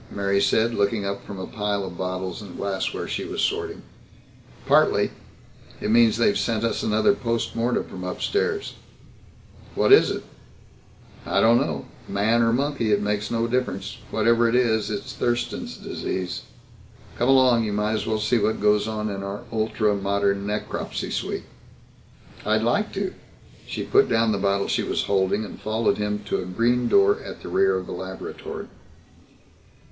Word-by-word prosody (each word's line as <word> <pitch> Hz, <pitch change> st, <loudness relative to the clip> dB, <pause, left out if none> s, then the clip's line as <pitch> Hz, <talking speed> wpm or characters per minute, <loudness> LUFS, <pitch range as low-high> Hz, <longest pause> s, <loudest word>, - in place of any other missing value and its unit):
Mary 100 Hz, 0 st, 0 dB
said, 115 Hz, +3 st, +2 dB
looking 100 Hz, 0 st, 0 dB
up 100 Hz, 0 st, -3 dB
from 100 Hz, -, -7 dB
a 95 Hz, -, -4 dB
pile 105 Hz, -3 st, -2 dB
of 90 Hz, -2 st, -6 dB
bottles 95 Hz, +1 st, -4 dB
and 100 Hz, -4 st, -10 dB
glassware 100 Hz, -1 st, -2 dB
she -, -, -3 dB
was -, -, -5 dB
sorting. -, -, -1 dB, 0.8 s
"Partly. -, -, +4 dB, 0.7 s
It -, -, -1 dB
means 115 Hz, -1 st, +5 dB
they've 115 Hz, -4 st, +3 dB
sent 115 Hz, -1 st, 0 dB
us 115 Hz, -, 0 dB
another 110 Hz, -, +3 dB
post 115 Hz, -, -2 dB
mortem 120 Hz, +2 st, +1 dB
from 90 Hz, -, -9 dB
upstairs." 410 Hz, -, -1 dB, 1.0 s
"What -, -, +5 dB
is 415 Hz, -, +7 dB
it?" -, -, -3 dB, 1.0 s
"I -, -, 0 dB
don't 115 Hz, +1 st, +5 dB
know 75 Hz, -4 st, -2 dB, 0.2 s
man 110 Hz, +4 st, +2 dB
or 115 Hz, 0 st, +3 dB
monkey, 135 Hz, -3 st, 0 dB
it 100 Hz, -, +4 dB
makes 105 Hz, 0 st, -1 dB
no 115 Hz, 0 st, 0 dB
difference. 115 Hz, -6 st, -2 dB
Whatever 115 Hz, +2 st, +3 dB
it 115 Hz, -, +1 dB
is, 110 Hz, -4 st, +2 dB
it's 105 Hz, -1 st, -4 dB
Thurston's 120 Hz, 0 st, -2 dB
Disease. 90 Hz, -1 st, -4 dB, 0.8 s
Come 120 Hz, -, +2 dB
along. 130 Hz, -3 st, +5 dB
You 105 Hz, -, -2 dB
might 105 Hz, +1 st, 0 dB
as 110 Hz, -, -2 dB
well 110 Hz, -1 st, +1 dB
see 110 Hz, +3 st, +2 dB
what 110 Hz, +1 st, 0 dB
goes 105 Hz, 0 st, +3 dB
on 110 Hz, -1 st, -2 dB
in 100 Hz, -2 st, -4 dB
our 100 Hz, +3 st, -5 dB
ultra 110 Hz, -1 st, +1 dB
modern 100 Hz, 0 st, 0 dB
necropsy 105 Hz, 0 st, -3 dB
suite." -, -, -3 dB, 1.0 s
"I'd 110 Hz, +1 st, +1 dB
like 165 Hz, -, +1 dB
to." 195 Hz, -1 st, -2 dB, 0.5 s
She -, -, -4 dB
put 410 Hz, +1 st, +3 dB
down 115 Hz, -1 st, +3 dB
the 100 Hz, -, 0 dB
bottle 100 Hz, 0 st, +1 dB
she -, -, +1 dB
was -, -, -1 dB
holding 100 Hz, +2 st, +1 dB
and -, -, -10 dB
followed 110 Hz, 0 st, 0 dB
him 105 Hz, 0 st, -2 dB
to 105 Hz, -, -1 dB
a -, -, -5 dB
green 120 Hz, +6 st, +1 dB
door 405 Hz, +2 st, +4 dB
at -, -, -9 dB
the -, -, -6 dB
rear 390 Hz, +2 st, +3 dB
of -, -, -5 dB
the -, -, -8 dB
laboratory. 430 Hz, 0 st, -6 dB
110 Hz, 170 wpm, -24 LUFS, 100-120 Hz, 1.0 s, is